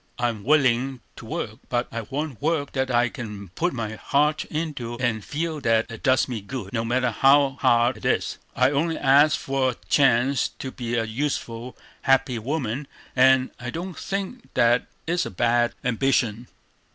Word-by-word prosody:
I'm 120 Hz, -4 st, -1 dB
willing 130 Hz, -2 st, +2 dB, 0.2 s
to -, -, -10 dB
work, -, -, -4 dB
but 120 Hz, 0 st, 0 dB
I 115 Hz, -, -3 dB
want 135 Hz, +3 st, -5 dB
work 150 Hz, -2 st, 0 dB
that 130 Hz, -1 st, -1 dB
I 120 Hz, 0 st, +3 dB
can 105 Hz, -6 st, -7 dB
put 170 Hz, -, -1 dB
my 115 Hz, -5 st, -4 dB
heart 150 Hz, +5 st, +1 dB
into, 145 Hz, -7 st, -4 dB
and 120 Hz, -4 st, -1 dB
feel 160 Hz, +4 st, -3 dB
that 115 Hz, -2 st, +1 dB
it 115 Hz, -, -8 dB
does 130 Hz, 0 st, +3 dB
me 120 Hz, -5 st, -4 dB
good, 130 Hz, +5 st, -7 dB
no 115 Hz, -2 st, 0 dB
matter 125 Hz, +1 st, +1 dB
how 135 Hz, +3 st, +4 dB
hard 120 Hz, +1 st, +3 dB
it -, -, -11 dB
is. -, -, 0 dB, 0.2 s
I -, -, +3 dB
only 160 Hz, +3 st, 0 dB
ask 145 Hz, +3 st, +5 dB
for 135 Hz, -1 st, 0 dB
a 125 Hz, -, -3 dB
chance 135 Hz, -1 st, +3 dB
to 130 Hz, -, -5 dB
be 120 Hz, -2 st, -4 dB
a 115 Hz, -, +1 dB
useful, 120 Hz, 0 st, -3 dB, 0.2 s
happy 135 Hz, -3 st, +2 dB
woman, 135 Hz, +1 st, -3 dB, 0.3 s
and 130 Hz, 0 st, +5 dB
I 120 Hz, +1 st, -5 dB
don't 175 Hz, +6 st, -5 dB
think 200 Hz, +5 st, -5 dB
that 120 Hz, +1 st, +3 dB, 0.2 s
is 175 Hz, +1 st, 0 dB
a -, -, -5 dB
bad 120 Hz, +4 st, +1 dB
ambition. 125 Hz, -2 st, +1 dB
130 Hz, 175 wpm, -24 LUFS, 120-145 Hz, 0.3 s, ask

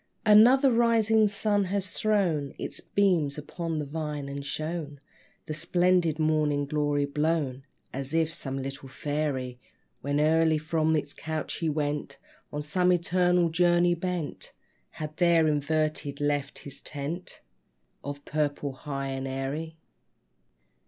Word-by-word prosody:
Another 245 Hz, +6 st, +7 dB
rising 225 Hz, -2 st, +4 dB
sun 205 Hz, 0 st, +1 dB
has 190 Hz, 0 st, -2 dB
thrown 175 Hz, -11 st, +1 dB
Its -, -, -5 dB
beams 175 Hz, -8 st, +1 dB
upon 165 Hz, +2 st, -4 dB
the 150 Hz, -, -2 dB
vine, 150 Hz, -1 st, -4 dB
and 140 Hz, 0 st, -5 dB
shown 155 Hz, 0 st, -4 dB, 0.5 s
The 155 Hz, -, -4 dB
splendid 175 Hz, 0 st, +2 dB
Morning 155 Hz, -2 st, +1 dB
Glory 145 Hz, 0 st, 0 dB
blown, 145 Hz, -2 st, -1 dB, 0.3 s
As 135 Hz, +1 st, -4 dB
if 165 Hz, 0 st, +1 dB
some 135 Hz, -5 st, -3 dB
little 135 Hz, 0 st, -6 dB
fairy, 135 Hz, -3 st, -3 dB, 0.4 s
When 145 Hz, +1 st, 0 dB
early 160 Hz, +1 st, +4 dB
from 160 Hz, 0 st, +1 dB
his 145 Hz, -2 st, -2 dB
couch 155 Hz, -1 st, -4 dB
he 165 Hz, -, 0 dB
went, 150 Hz, -1 st, -2 dB, 0.3 s
On 150 Hz, 0 st, -3 dB
some 180 Hz, +4 st, +2 dB
ethereal 180 Hz, 0 st, +2 dB
journey 175 Hz, +1 st, +3 dB
bent, 175 Hz, -2 st, -4 dB, 0.4 s
Had 155 Hz, 0 st, -7 dB
there 170 Hz, -2 st, +4 dB
inverted 150 Hz, -1 st, -1 dB
left 145 Hz, -1 st, -1 dB
his 140 Hz, -, -8 dB
tent 155 Hz, +5 st, -5 dB, 0.6 s
Of 145 Hz, +1 st, -6 dB
purple, 145 Hz, -2 st, -1 dB
high 140 Hz, 0 st, -5 dB
and 135 Hz, 0 st, -3 dB
airy. 140 Hz, +5 st, -4 dB
155 Hz, 130 wpm, -28 LUFS, 145-175 Hz, 0.6 s, Another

